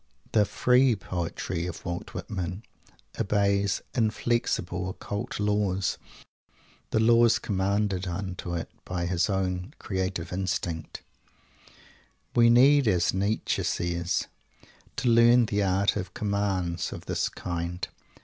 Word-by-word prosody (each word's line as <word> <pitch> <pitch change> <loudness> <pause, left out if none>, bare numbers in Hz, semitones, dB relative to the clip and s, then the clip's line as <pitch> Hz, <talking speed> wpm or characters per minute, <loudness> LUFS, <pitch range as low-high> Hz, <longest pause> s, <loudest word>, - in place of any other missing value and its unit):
The 105 -2 +4
"free" 125 +3 +3
poetry 85 -2 -3
of 90 - -7
Walt 90 +3 -5
Whitman 95 0 -4 0.6
obeys 100 0 +1
inflexible, 110 -6 0
occult 100 +2 -5
laws, 105 -3 0 0.9
the - - +1
laws 115 +1 +5
commanded 100 -1 0
unto 90 -1 -4
it 85 - -4
by 90 -1 -3
his 90 +3 +1
own 95 - -2
creative 95 -3 -3
instinct. 85 -3 -3 1.3
We 115 -1 +6
need, 135 +3 +6
as 90 -4 +2
Nietzsche 100 +3 0
says, 85 0 -1 0.7
to 125 - -2
learn 120 +1 +6
the 105 -1 0
art 95 0 +2
of 95 -3 -5
"commands" 95 -5 -1
of - - -8
this - - -1
kind! 90 +1 -4
95 Hz, 110 wpm, -27 LUFS, 90-105 Hz, 1.3 s, We